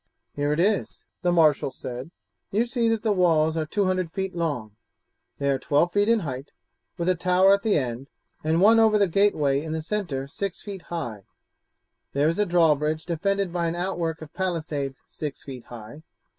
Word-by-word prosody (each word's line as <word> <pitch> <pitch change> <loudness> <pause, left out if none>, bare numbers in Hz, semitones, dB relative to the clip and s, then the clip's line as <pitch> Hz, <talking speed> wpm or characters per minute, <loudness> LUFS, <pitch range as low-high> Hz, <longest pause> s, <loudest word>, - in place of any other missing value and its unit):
"Here 145 0 -1
it 150 - 0
is," 200 +3 0 0.2
the 180 -2 +2
marshal 155 -5 +4
said. 130 +1 -7 0.4
"You 220 +4 +1
see 240 -2 0
that 225 -1 0
the 220 - +2
walls 165 -5 +3
are 160 -1 -1
200 185 -2 0
feet 190 0 -3
long, 145 -11 -3 0.6
they 140 - -2
are 135 - 0
12 150 +6 +2
feet 205 +3 +2
in 230 -2 +3
height, 135 -3 -6 0.4
with 170 - -2
a 185 - +4
tower 185 +2 +4
at 200 - +2
the 215 -5 +2
end 130 -1 -3 0.4
and 160 +2 +2
one 225 +3 +6
over 220 -1 +5
the 200 -1 +3
gateway 155 -7 +2
in 155 0 -5
the 160 0 -3
centre 165 -8 -2
six 195 +6 -5
feet 200 -3 -7
high. 120 - -5 0.9
There 145 +2 +2
is 165 +4 0
a 210 - +2
drawbridge 155 -2 +2
defended 195 +2 -1
by 170 -1 0
an 165 - -2
outwork 170 -3 -2
of 150 - -13
palisades 155 -7 -3
six 150 -3 -6
feet 130 -3 -9
high. 120 +5 -10
165 Hz, 185 wpm, -25 LUFS, 145-195 Hz, 0.9 s, one